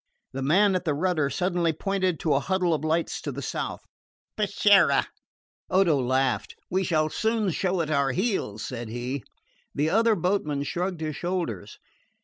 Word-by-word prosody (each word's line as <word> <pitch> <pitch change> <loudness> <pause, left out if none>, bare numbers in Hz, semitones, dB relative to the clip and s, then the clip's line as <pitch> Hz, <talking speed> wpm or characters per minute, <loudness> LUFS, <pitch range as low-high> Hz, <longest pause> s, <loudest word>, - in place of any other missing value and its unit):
The 135 - -4
man 190 +9 +4
at 185 -1 0
the 155 -5 0
rudder 155 -3 +1
suddenly 175 -1 0
pointed 185 0 -1
to 155 - +2
a 135 - +3
huddle 180 +2 0
of 155 -1 -2
lights 160 +1 -1
to 145 - -4
the 140 +1 -6
south. - - -4 0.5
"Peschiera." 200 -7 +4 0.6
Odo 185 -4 +4
laughed. 130 0 0 0.2
"We 190 +2 +1
shall 155 -3 +1
soon 220 -3 0
show 185 +1 0
it 155 -1 -3
our 140 -2 +2
heels," 180 - -1
said 120 -3 -6
he. 120 +3 -4 0.5
The 150 +3 +1
other 225 +1 +4
boatman 165 -6 0
shrugged 175 +3 -3
his 155 -2 -3
shoulders. 140 - -3
165 Hz, 160 wpm, -26 LUFS, 140-190 Hz, 0.6 s, man